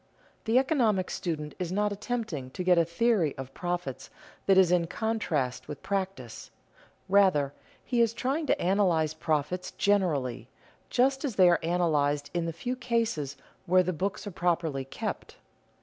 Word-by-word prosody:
The 225 Hz, +2 st, +3 dB
economic 240 Hz, -, +2 dB
student 155 Hz, -4 st, -3 dB
is 180 Hz, -2 st, -3 dB
not 210 Hz, +2 st, +1 dB
attempting 205 Hz, -, -4 dB
to 180 Hz, -, -2 dB
get 180 Hz, -1 st, +4 dB
a -, -, +5 dB
theory 170 Hz, -, +1 dB
of 135 Hz, 0 st, -7 dB
profits 175 Hz, -7 st, -4 dB, 0.4 s
that 195 Hz, -1 st, +5 dB
is 185 Hz, -2 st, +6 dB
in 175 Hz, -2 st, +2 dB
contrast 165 Hz, -, -2 dB
with 150 Hz, -, -8 dB
practice. 190 Hz, -, -4 dB, 0.6 s
Rather, 185 Hz, -8 st, +3 dB, 0.3 s
he 245 Hz, -2 st, +1 dB
is 230 Hz, -2 st, +3 dB
trying 270 Hz, +6 st, -2 dB
to -, -, +2 dB
analyze 175 Hz, -5 st, +2 dB
profits 155 Hz, +3 st, -1 dB
generally, 145 Hz, -, 0 dB, 0.4 s
just 265 Hz, +2 st, +2 dB
as 265 Hz, -7 st, -2 dB
they 185 Hz, -2 st, +6 dB
are 170 Hz, -, +3 dB
analyzed 150 Hz, -4 st, +1 dB
in 170 Hz, -1 st, -1 dB
the -, -, -1 dB
few 245 Hz, +10 st, -4 dB
cases 230 Hz, -, -1 dB, 0.3 s
where 185 Hz, +1 st, +5 dB
the 185 Hz, +1 st, -1 dB
books 190 Hz, +7 st, -3 dB
are 205 Hz, -, -5 dB
properly 170 Hz, -6 st, -1 dB
kept. 135 Hz, -, -5 dB
180 Hz, 155 wpm, -28 LUFS, 155-210 Hz, 0.6 s, is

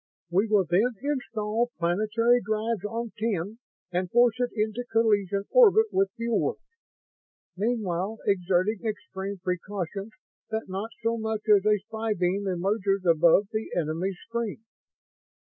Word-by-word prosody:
We 195 Hz, +5 st, +2 dB
will 210 Hz, -3 st, +3 dB
then 205 Hz, +9 st, +2 dB
install 240 Hz, -5 st, -1 dB
planetary 215 Hz, +8 st, +2 dB
drives 215 Hz, 0 st, -2 dB
on 230 Hz, +1 st, -3 dB
Ten 215 Hz, -1 st, -2 dB, 0.3 s
and 180 Hz, 0 st, -1 dB
force 240 Hz, +2 st, +4 dB
it 245 Hz, -1 st, +1 dB
into 215 Hz, +2 st, -1 dB
collision 205 Hz, -4 st, +2 dB
orbit 445 Hz, -3 st, +6 dB
with 195 Hz, 0 st, +2 dB
Fuel 230 Hz, -1 st, 0 dB
World, -, -, -1 dB, 1.0 s
meanwhile 205 Hz, -1 st, -1 dB
exerting 190 Hz, +2 st, +1 dB
extreme 200 Hz, -3 st, -4 dB
precautions 195 Hz, +2 st, -4 dB, 0.4 s
that 220 Hz, 0 st, -3 dB
not 195 Hz, +4 st, -4 dB
so 230 Hz, 0 st, 0 dB
much 220 Hz, -1 st, -2 dB
as 200 Hz, +1 st, +1 dB
a 210 Hz, 0 st, +5 dB
spy 220 Hz, +2 st, -3 dB
beam 185 Hz, +2 st, 0 dB
emerges 195 Hz, +1 st, 0 dB
above 170 Hz, +4 st, +5 dB
the 220 Hz, 0 st, -3 dB
enemy's 175 Hz, +4 st, -1 dB
screen. 230 Hz, -2 st, -3 dB
210 Hz, 130 wpm, -27 LUFS, 190-225 Hz, 1.0 s, orbit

